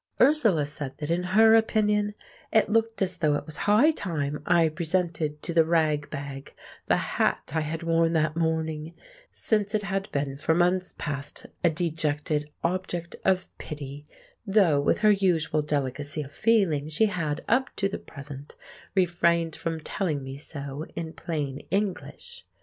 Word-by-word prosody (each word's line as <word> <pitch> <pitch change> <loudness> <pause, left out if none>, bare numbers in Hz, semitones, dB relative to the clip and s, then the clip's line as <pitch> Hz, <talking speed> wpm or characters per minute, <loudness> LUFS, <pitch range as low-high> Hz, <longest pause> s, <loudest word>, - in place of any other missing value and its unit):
Ursula 235 - +4
said 145 -2 -6
that 150 +1 -3
in 170 +1 +1 0.2
her 220 0 +8
opinion 210 -2 +2 0.4
it 220 - +3
looked 225 -1 +2
as 185 -1 -2
though 150 -2 +3
it - - -3
was 155 -2 -7
high 235 +10 +6
time 150 - -3
I 170 -2 +5
presented 160 -2 -1
to 170 - -3
the 165 -1 +6
ragbag 150 -4 -1 0.3
the - - +4
hat - - 0
I 160 - +1
had 155 +2 -4
worn 165 0 +2
that 155 -1 +1
morning, 160 -1 -1 0.4
since 210 -1 0
it 210 - 0
had 195 +1 -3
been 140 -1 -2
for 160 +2 +1
months 180 +1 +1
past 140 -1 -4 0.2
a 170 - +6
dejected 155 -2 -1
object 175 -1 -2
of 185 -1 +2
pity, 145 -1 -7 0.4
though 195 -8 +4
with 145 - +1
her 215 -1 +6
usual 175 -6 +2
delicacy 145 +1 -2
of 140 - -11
feeling 170 -8 +2
she 165 +8 +3
had, 165 -6 -2
up 255 +3 +2
to 195 - +1
the 195 - -5
present, 140 -1 -10 0.4
refrained 170 -3 +2
from 165 -1 -3
telling 155 -6 -2
me 135 0 -6
so 140 0 -7
in 165 -1 -5
plain 145 -5 -3
English. 205 - -3
165 Hz, 155 wpm, -27 LUFS, 150-190 Hz, 0.4 s, her